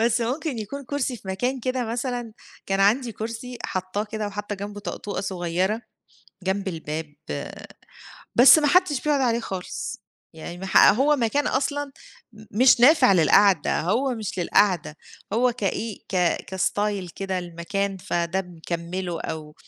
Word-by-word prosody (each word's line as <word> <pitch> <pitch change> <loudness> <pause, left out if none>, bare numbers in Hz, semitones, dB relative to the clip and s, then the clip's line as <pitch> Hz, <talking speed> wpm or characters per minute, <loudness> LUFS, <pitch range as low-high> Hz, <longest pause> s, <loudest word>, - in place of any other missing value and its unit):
بس 230 +1 +2
ممكن 260 +3 -2
يكون 275 +7 -6
كرسي 260 -1 -2
في 195 - -13
مكان 250 +8 -1
كده 255 0 -1
مثلًا، 240 0 -3 0.3
كان 195 0 0
عندي 230 +5 +3
كرسي 230 +3 -6
حاطاه 185 +3 -2
كده، 215 0 -4
وحاطة 205 +1 -5
جنبه 205 +1 -7
طقطوقة 200 -1 -5
صغيرة 185 +3 -1 0.6
جنب 195 +1 -1
الباب، 160 -3 -5 1.2
بس 255 +4 +9
ما 300 - +2
حدش 325 -3 +3
بيقعد 295 -1 +1
عليه 235 -3 +2
خالص. 190 -1 -5 0.3
يعني 165 +2 -8
ما 190 - -6
ح - - +4
هو 280 +7 +3
مكان 280 +4 0
أصلًا 285 +1 -1 0.4
م 215 0 -14 0.2
مش 255 -2 +6
نافع 265 -2 +7
للقَعدة، 185 0 +4
هو 250 - 0
مش 215 -4 -5
للقعدة، 175 -3 +2 0.4
هو 245 +3 +3
كإيه؟ 215 -1 -3
ك 190 - -2 0.4
كstyle 195 0 -1
كده 190 -2 -2
للمكان، 180 +3 -3
فده 180 -1 -1
مِكَمِّله 175 0 -5
أو 150 -1 -6
205 Hz, 145 wpm, -24 LUFS, 185-250 Hz, 1.2 s, بس